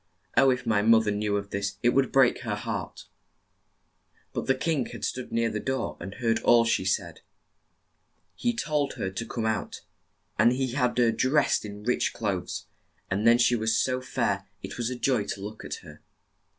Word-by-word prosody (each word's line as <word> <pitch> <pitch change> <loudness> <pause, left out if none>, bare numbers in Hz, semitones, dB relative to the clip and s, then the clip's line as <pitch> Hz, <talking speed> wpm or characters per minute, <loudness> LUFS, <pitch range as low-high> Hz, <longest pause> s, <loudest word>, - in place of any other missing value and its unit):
Oh, 135 +2 +6
if 130 0 0
my 105 -2 +2
moth 110 +1 +5
er 105 - +1
knew 105 0 0
of 100 0 -5
this 100 0 -2
it 120 - +5
would 135 +1 +2
break 135 -2 +4
her 115 -5 -3
heart! 105 -3 -5 0.4
' - - -46
' - - -40
But - - -3
the 135 - +3
king 145 -1 0
had - - -5
stood 130 -1 -4
near 115 0 +1
the 110 - -2
door 130 +4 -2
and 95 - -7
heard 115 -2 0
all 115 -1 +5
she 115 -5 +1
said. 95 - -1 1.1
He 240 -1 -1
told 150 -10 -1
her 95 - -3
to 105 +5 -4
come 115 -1 -3
out, 110 -1 -2 0.6
and 115 +3 +5
had 130 -1 0
her 120 -2 +4
dressed 135 0 +2
in 105 0 -8
rich 125 +3 0
clothes, 95 -5 -3 0.5
and 100 +4 +1
then 120 0 +7
she 120 0 +4
was 110 0 +1
so 130 0 +1
fair 130 - -1 0.2
it - - -6
was 120 0 0
joy 120 -4 +1
to 100 - -5
look 105 +2 -7
at - - -4
her. - - -13
115 Hz, 195 wpm, -27 LUFS, 105-130 Hz, 1.1 s, then